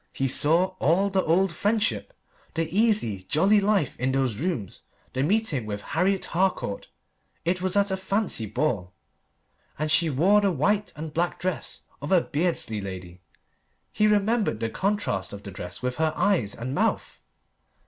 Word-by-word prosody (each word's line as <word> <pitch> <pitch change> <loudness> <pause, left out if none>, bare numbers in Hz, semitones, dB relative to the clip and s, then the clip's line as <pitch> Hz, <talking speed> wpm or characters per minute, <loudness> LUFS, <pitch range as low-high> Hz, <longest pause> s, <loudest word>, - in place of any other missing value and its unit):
He 135 - 0
saw 165 +8 +3
all 190 +7 +2
the 190 0 +2
old 180 +2 +2
friendship: 215 - 0 0.4
the 165 0 +1
easy, 205 - +2
jolly 190 - +3
life 200 -7 +1
in 130 +2 +1
those 130 -5 0
rooms, 135 - -3 0.3
the 130 - -1
meeting 155 - 0
with 105 -1 -5
Harriet 190 +1 +1
Harcourt 180 - -1 0.6
it 180 +2 0
was 185 +1 0
at 200 -1 +2
a 190 - 0
fancy 190 - -1
ball, 105 -6 -1 0.8
and 155 +1 -1
she 160 +2 +3
wore 185 +9 +4
the 200 - +2
white 200 +7 +1
and 155 0 -7
black 175 +2 -1
dress 185 -2 -3 0.2
of 145 - -5
a 185 - +6
Beardsley 150 - -1
lady; 90 -2 -8 0.7
he 210 - +2
remembered 210 - +2
the 115 0 -2
contrast 190 - -1
of 100 0 -8
the 100 - -7
dress 90 +4 -8
with 125 0 -2
her 160 0 +1
eyes 175 - +1
and 125 +3 -5
mouth. - - -1
165 Hz, 160 wpm, -26 LUFS, 125-195 Hz, 0.8 s, a